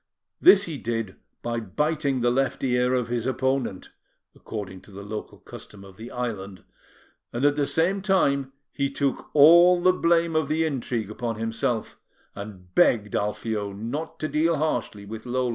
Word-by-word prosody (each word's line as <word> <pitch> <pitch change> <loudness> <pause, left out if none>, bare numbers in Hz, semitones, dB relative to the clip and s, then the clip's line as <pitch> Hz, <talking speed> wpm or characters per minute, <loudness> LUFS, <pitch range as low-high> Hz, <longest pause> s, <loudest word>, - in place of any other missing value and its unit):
This 370 - +7
he 155 -5 -5
did 115 -4 -3 0.3
by 120 0 -2
biting 140 +5 -1
the 120 0 +3
left 135 +2 0
ear 125 0 +2
of 125 -2 0
his 120 0 -2
opponent, 130 -6 -1 0.4
according 95 -4 -7
to - - -17
the 100 +1 -9
local 105 +1 -7
custom 100 -2 -12
of 95 -1 -14
the 115 +2 -9
island; 105 -6 -5 0.7
and 120 +4 -1
at 145 0 +4
the 145 -1 0
same 185 +5 +1
time, 140 -9 +1 0.2
he 140 -1 -1
took 140 0 -2
all 170 +4 +8
the 185 +1 +4
blame 170 -2 +2
of 155 -2 +1
the 160 +2 +1
intrigue 120 -7 -3
upon 115 +1 -3
himself, 115 +1 -2 0.3
and 95 -3 -10
begged 105 0 +3
Alfio 105 0 -2
not 120 +11 -5
to 155 - 0
deal 160 +2 +1
harshly 125 -9 -2
with 110 +3 -8
Lola. 125 0 0
125 Hz, 165 wpm, -25 LUFS, 110-150 Hz, 0.7 s, all